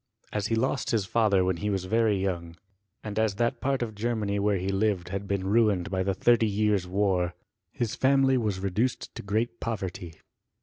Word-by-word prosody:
As 105 Hz, -1 st, -1 dB
he 115 Hz, -, +1 dB
lost 130 Hz, +3 st, 0 dB
his 110 Hz, -4 st, +1 dB
father 100 Hz, -4 st, +2 dB
when 90 Hz, -1 st, 0 dB
he 105 Hz, +4 st, -2 dB
was 95 Hz, -2 st, -1 dB
very 110 Hz, 0 st, +2 dB
young, 85 Hz, -3 st, -3 dB, 0.5 s
and 110 Hz, 0 st, -3 dB
as 110 Hz, -3 st, +1 dB
that 120 Hz, +3 st, 0 dB
part 135 Hz, -2 st, 0 dB
of 110 Hz, -2 st, -5 dB
Germany 105 Hz, -2 st, -1 dB
where 100 Hz, 0 st, +2 dB
he 95 Hz, +1 st, -2 dB
lived 95 Hz, -3 st, 0 dB
had 100 Hz, +1 st, -4 dB
been 100 Hz, -1 st, -1 dB
ruined 100 Hz, -3 st, +2 dB
by 95 Hz, -1 st, 0 dB
the 95 Hz, 0 st, 0 dB
thirty 115 Hz, +2 st, +3 dB
years' 105 Hz, -2 st, +1 dB
war, 90 Hz, -2 st, 0 dB, 0.4 s
his 115 Hz, -3 st, -2 dB
family 135 Hz, 0 st, +3 dB
was 105 Hz, -6 st, 0 dB
reduced 100 Hz, +6 st, -1 dB
to -, -, -7 dB
great 110 Hz, +4 st, -2 dB
poverty. 95 Hz, -6 st, -4 dB
105 Hz, 190 wpm, -27 LUFS, 95-115 Hz, 0.5 s, thirty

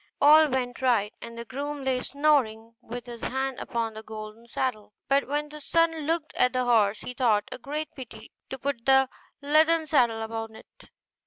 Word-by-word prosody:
All 305 Hz, +1 st, +7 dB
went 255 Hz, -1 st, -2 dB
right, 230 Hz, -5 st, +2 dB
and 235 Hz, 0 st, -9 dB
the 235 Hz, -, -6 dB
groom 285 Hz, +3 st, -5 dB
lay 260 Hz, -1 st, +1 dB
snoring 255 Hz, -7 st, +1 dB
with 245 Hz, +1 st, -7 dB
his 240 Hz, -2 st, -9 dB
hand 265 Hz, 0 st, -2 dB
upon 230 Hz, -1 st, -3 dB
the 220 Hz, -, -8 dB
golden 215 Hz, +1 st, -9 dB
saddle. 220 Hz, -4 st, -3 dB
But 275 Hz, +1 st, +2 dB
when 295 Hz, +2 st, -2 dB
the 300 Hz, 0 st, -10 dB
son 330 Hz, +3 st, +2 dB
looked 325 Hz, -1 st, -1 dB
at 250 Hz, +1 st, +2 dB
the 255 Hz, 0 st, +1 dB
horse, 215 Hz, -4 st, +3 dB
he 250 Hz, -, -6 dB
thought 225 Hz, -5 st, +2 dB
it -, -, -3 dB
a -, -, -6 dB
great 300 Hz, +4 st, -5 dB
pity 225 Hz, -4 st, -11 dB, 0.2 s
to 265 Hz, -, -5 dB
put 265 Hz, -2 st, -4 dB
the 265 Hz, -1 st, +5 dB, 0.3 s
leathern 315 Hz, +2 st, +4 dB
saddle 240 Hz, -7 st, +2 dB
upon 225 Hz, 0 st, -5 dB
it. -, -, -17 dB
255 Hz, 190 wpm, -27 LUFS, 225-285 Hz, 0.3 s, All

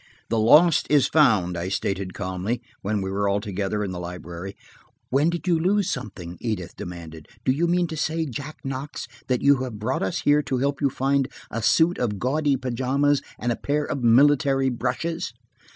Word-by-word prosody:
"The 115 Hz, -, +1 dB
lost 150 Hz, +9 st, +5 dB
is 145 Hz, -3 st, +5 dB
found," 105 Hz, -, +3 dB
I 85 Hz, +2 st, -3 dB
stated 95 Hz, -1 st, -2 dB
calmly, 95 Hz, +7 st, -3 dB, 0.2 s
when 105 Hz, 0 st, -1 dB
we 95 Hz, -, -3 dB
were 100 Hz, +1 st, 0 dB
all 100 Hz, +1 st, +1 dB
together 105 Hz, 0 st, -2 dB
in 100 Hz, -, -3 dB
the 90 Hz, -, -5 dB
library. 90 Hz, +1 st, -7 dB, 0.6 s
"When 140 Hz, +5 st, +3 dB
did 170 Hz, +2 st, -4 dB
you 170 Hz, -2 st, +3 dB
lose 195 Hz, +3 st, +1 dB
anything?" 90 Hz, -4 st, -8 dB
Edith 100 Hz, -7 st, -3 dB
demanded. 80 Hz, -3 st, -8 dB, 0.2 s
"Do -, -, +4 dB
you 160 Hz, +6 st, +1 dB
mean 175 Hz, +1 st, +2 dB
to 160 Hz, -, -5 dB
say, 160 Hz, +1 st, -1 dB
Jack 145 Hz, +3 st, -6 dB
Knox, 135 Hz, 0 st, -5 dB, 0.2 s
that 125 Hz, -2 st, 0 dB
you 140 Hz, 0 st, +6 dB
brought 110 Hz, +3 st, -3 dB
us 95 Hz, -, -1 dB
here 145 Hz, +1 st, +4 dB
to 135 Hz, -3 st, -2 dB
help 140 Hz, +2 st, -1 dB
you 140 Hz, -, +3 dB
find 135 Hz, +1 st, +1 dB, 0.2 s
a 115 Hz, -, -3 dB
suit 165 Hz, +9 st, +3 dB
of 110 Hz, -5 st, -1 dB
gaudy 140 Hz, +5 st, +1 dB
pajamas 130 Hz, +3 st, +1 dB, 0.2 s
and 120 Hz, -, -1 dB
a -, -, 0 dB
pair 145 Hz, +1 st, 0 dB
of 140 Hz, -, -3 dB
military 135 Hz, +2 st, +4 dB
brushes 130 Hz, +5 st, -2 dB
125 Hz, 185 wpm, -24 LUFS, 100-145 Hz, 0.6 s, you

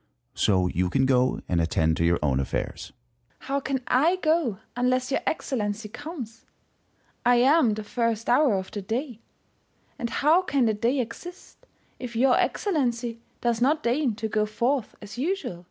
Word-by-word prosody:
So 95 Hz, -3 st, +2 dB
you 90 Hz, 0 st, 0 dB
can 130 Hz, +8 st, +2 dB
go 130 Hz, -1 st, +2 dB
and 85 Hz, -2 st, +1 dB
attend 80 Hz, -1 st, +1 dB
to -, -, 0 dB
your 85 Hz, 0 st, +3 dB
own 70 Hz, -3 st, +1 dB
affairs. 70 Hz, -, -4 dB, 0.5 s
First 260 Hz, -, -10 dB
Hour. -, -, 0 dB
How 280 Hz, -, +2 dB
can 270 Hz, -1 st, -2 dB
I 310 Hz, +8 st, +3 dB
go 315 Hz, -, +1 dB, 0.2 s
unless 255 Hz, +1 st, 0 dB
your -, -, +1 dB
Excellency 215 Hz, -7 st, -2 dB
comes? 240 Hz, -5 st, -8 dB, 0.8 s
I 245 Hz, 0 st, +5 dB
am 250 Hz, -2 st, +4 dB
the 215 Hz, -, -5 dB
first 230 Hz, 0 st, -1 dB
Hour 255 Hz, -3 st, +4 dB
of 190 Hz, -1 st, -4 dB
the 205 Hz, -, -5 dB
day, 235 Hz, +4 st, -4 dB, 0.8 s
and 235 Hz, -, -2 dB
how 310 Hz, +8 st, +3 dB
can 280 Hz, -8 st, +1 dB
the 220 Hz, -, +2 dB
day 235 Hz, +6 st, 0 dB
exist, 345 Hz, +10 st, -8 dB, 0.3 s
if 245 Hz, -2 st, -7 dB
your 250 Hz, +2 st, +4 dB
Excellency 240 Hz, -, -1 dB, 0.2 s
does 235 Hz, -1 st, 0 dB
not 300 Hz, +5 st, +2 dB
deign 245 Hz, -1 st, +1 dB
to 225 Hz, +1 st, -3 dB
go 215 Hz, 0 st, 0 dB
forth 240 Hz, +3 st, -1 dB
as 210 Hz, +4 st, -9 dB
usual 285 Hz, -, -2 dB
240 Hz, 170 wpm, -26 LUFS, 210-275 Hz, 0.8 s, I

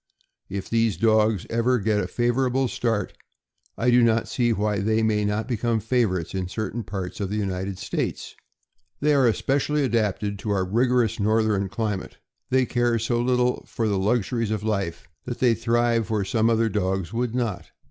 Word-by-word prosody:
If 95 Hz, 0 st, -4 dB
these 115 Hz, -2 st, +1 dB
dogs 110 Hz, -3 st, +2 dB
ever 115 Hz, +2 st, +2 dB
get 105 Hz, -1 st, +1 dB
a -, -, -1 dB
favorable 125 Hz, +2 st, +1 dB
start, 115 Hz, -4 st, -1 dB, 0.6 s
I 125 Hz, +1 st, +2 dB
do 120 Hz, 0 st, +5 dB
not 115 Hz, -1 st, +2 dB
see 120 Hz, -2 st, +1 dB
why 105 Hz, -1 st, 0 dB
they 110 Hz, +2 st, +1 dB
may 105 Hz, -1 st, +1 dB
not 105 Hz, +2 st, -1 dB
become 120 Hz, -2 st, 0 dB
favorites 110 Hz, -7 st, 0 dB
in 95 Hz, -1 st, -2 dB
certain 110 Hz, +4 st, -4 dB
parts 95 Hz, +1 st, -5 dB
of 100 Hz, -2 st, -2 dB
the 105 Hz, -, -3 dB
United 95 Hz, -2 st, -3 dB
States. 100 Hz, -, -4 dB, 0.6 s
They 150 Hz, +1 st, +3 dB
are 135 Hz, -3 st, +4 dB
especially 140 Hz, +5 st, +1 dB
adapted 105 Hz, -4 st, 0 dB
to 105 Hz, -, -5 dB
our 95 Hz, -2 st, +1 dB
rigorous 115 Hz, +2 st, +1 dB
northern 105 Hz, -2 st, +1 dB
cli 105 Hz, 0 st, -1 dB
mate. -, -, -10 dB, 0.3 s
They 130 Hz, 0 st, +3 dB
care 120 Hz, 0 st, +1 dB
so 120 Hz, +1 st, 0 dB
little 125 Hz, 0 st, +1 dB
for 115 Hz, -, -2 dB
the 100 Hz, -2 st, 0 dB
luxuries 115 Hz, +2 st, 0 dB
of 110 Hz, -1 st, -2 dB
life 100 Hz, -6 st, -2 dB, 0.2 s
that 120 Hz, -1 st, -4 dB
they 125 Hz, -2 st, +3 dB
thrive 115 Hz, 0 st, +1 dB
where 105 Hz, -3 st, 0 dB
some 115 Hz, +2 st, +2 dB
other 115 Hz, 0 st, +2 dB
dogs 95 Hz, -3 st, -1 dB
would 120 Hz, 0 st, -1 dB
not. 115 Hz, -7 st, -2 dB
110 Hz, 180 wpm, -24 LUFS, 100-120 Hz, 0.6 s, do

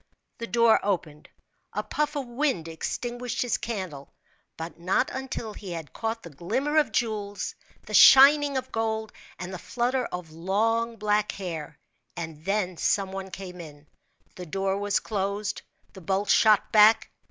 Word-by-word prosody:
The 230 Hz, -, -4 dB
door 230 Hz, -1 st, +4 dB
opened; 170 Hz, -7 st, -3 dB, 0.4 s
a 210 Hz, -, -2 dB
puff 300 Hz, +7 st, -2 dB
of 280 Hz, -2 st, -2 dB
wind 240 Hz, -, -1 dB
extinguished 240 Hz, +10 st, -3 dB
his 245 Hz, -, -1 dB
candle, 185 Hz, -11 st, -5 dB, 0.5 s
but 165 Hz, +1 st, -7 dB
not 185 Hz, +9 st, +1 dB
until 260 Hz, -4 st, -5 dB
he 190 Hz, -4 st, -7 dB
had 160 Hz, -5 st, -7 dB
caught 225 Hz, 0 st, -3 dB
the 170 Hz, -, -10 dB
glimmer 255 Hz, -, -1 dB
of 305 Hz, -, +3 dB
jewels, 210 Hz, -4 st, -2 dB, 0.3 s
the -, -, -9 dB
shining 280 Hz, +1 st, +8 dB
of 260 Hz, 0 st, -5 dB
gold, 220 Hz, -1 st, -2 dB, 0.2 s
and 185 Hz, +1 st, -6 dB
the 185 Hz, -, -6 dB
flutter 245 Hz, +4 st, -1 dB
of 180 Hz, -3 st, -6 dB
long, 225 Hz, +7 st, 0 dB
black 210 Hz, -1 st, 0 dB
hair; 165 Hz, -6 st, -6 dB, 0.4 s
and 160 Hz, -2 st, -6 dB
then 195 Hz, -3 st, -1 dB
some 195 Hz, +1 st, +1 dB
one 190 Hz, 0 st, -6 dB
came 180 Hz, -1 st, -8 dB
in. 150 Hz, -2 st, -12 dB, 0.5 s
The 180 Hz, -1 st, -7 dB
door 195 Hz, +3 st, -1 dB
was 205 Hz, 0 st, +1 dB
closed; 200 Hz, 0 st, -3 dB, 0.3 s
the 190 Hz, -, -11 dB
bolts 195 Hz, +4 st, +1 dB
shot 215 Hz, -2 st, +4 dB
back! 220 Hz, +1 st, +6 dB
205 Hz, 155 wpm, -26 LUFS, 180-235 Hz, 0.5 s, shining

